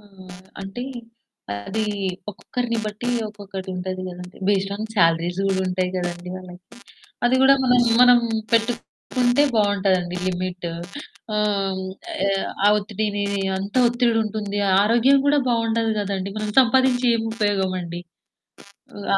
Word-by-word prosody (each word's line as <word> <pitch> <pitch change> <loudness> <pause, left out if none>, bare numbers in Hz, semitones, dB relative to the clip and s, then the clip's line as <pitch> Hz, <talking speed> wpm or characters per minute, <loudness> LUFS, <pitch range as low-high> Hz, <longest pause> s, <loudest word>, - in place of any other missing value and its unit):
ఆ! - - -21 0.6
అంటే, 195 +5 -6 0.9
అది 220 +2 -1 0.5
ఒక్కొక్కరిని 235 +3 -3
బట్టి 215 +3 -4 0.2
ఒక్కొక్కటి 200 -2 -8
ఉంటది 185 0 -4
గదండి. 180 0 -10
బేస్డ్ 195 -1 +1
ఆన్ 215 +1 -4
శాలరీస్ 170 +1 +2
గూడా 190 -1 +1
ఉంటయి 180 0 -1
గదండి 175 0 -4
వాళ్ళకి. 180 -1 -11 0.6
అది 245 - +3
గూడా 275 +1 +7
మనం, 250 -1 +4 0.2
మనం 245 -1 +7 0.3
పెట్టుకుంటే 245 +3 +1
బావుంటదండి 190 -4 +1
లిమిట్. 180 -1 -3 0.6
హ్మ్. 210 - -1
ఆహ్, 195 -3 0 0.8
ఆహ్, 205 - +6
ఒత్తిడిని 205 0 -2 0.3
అంత 200 +3 -6
ఒత్తిడి 240 -1 +1
ఉంటుంది, 205 -1 -3
ఆ - - +3
ఆరోగ్యం 240 +5 +4
కూడా 290 0 +4
బావుండదు 230 -1 +1
గదండి, 195 -1 -3
మనం 215 0 -3
సంపాదించి 255 0 +3
ఏం 225 - -2
ఉపయోగమండి? 185 -5 -1 0.9
హ్మ్, 205 - -8
205 Hz, 120 wpm, -22 LUFS, 185-230 Hz, 0.9 s, గూడా